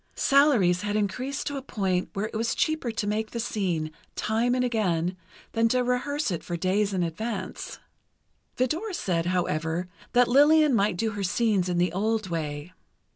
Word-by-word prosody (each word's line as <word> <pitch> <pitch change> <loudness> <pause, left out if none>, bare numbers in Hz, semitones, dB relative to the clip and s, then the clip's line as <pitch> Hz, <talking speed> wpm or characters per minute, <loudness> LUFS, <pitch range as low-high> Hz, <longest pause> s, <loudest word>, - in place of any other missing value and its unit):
Salaries 245 -11 +4
had 205 0 -2
increased 230 +7 -2
to 285 - -3
a - - -4
point 190 -8 -1
where 200 +2 -2
it 220 - -7
was 225 +1 0
cheaper 315 -6 0
to 225 -2 -2
make 215 +1 -1
the 235 - -5
scene, 180 -9 -1 0.2
time 230 +3 +1
and 250 0 +1
again, 185 -7 0 0.4
than 230 0 +2
to 250 +2 +2
rehearse 250 +2 -1
it 170 - -3
for 175 - -4
days 195 +4 +1
in 185 -2 0
advance. 185 +3 -4 0.8
Vidor 325 - -1
said, 175 - -1
however, 175 -1 -1 0.2
that 245 0 +5
Lillian 295 +3 +5
might 200 -4 +2
do 220 +3 0
her 205 -1 -5
scenes 205 -1 +1
in 175 - 0
the 175 -1 +1
old 215 +1 0
way. 155 0 -4
210 Hz, 175 wpm, -26 LUFS, 180-245 Hz, 0.8 s, that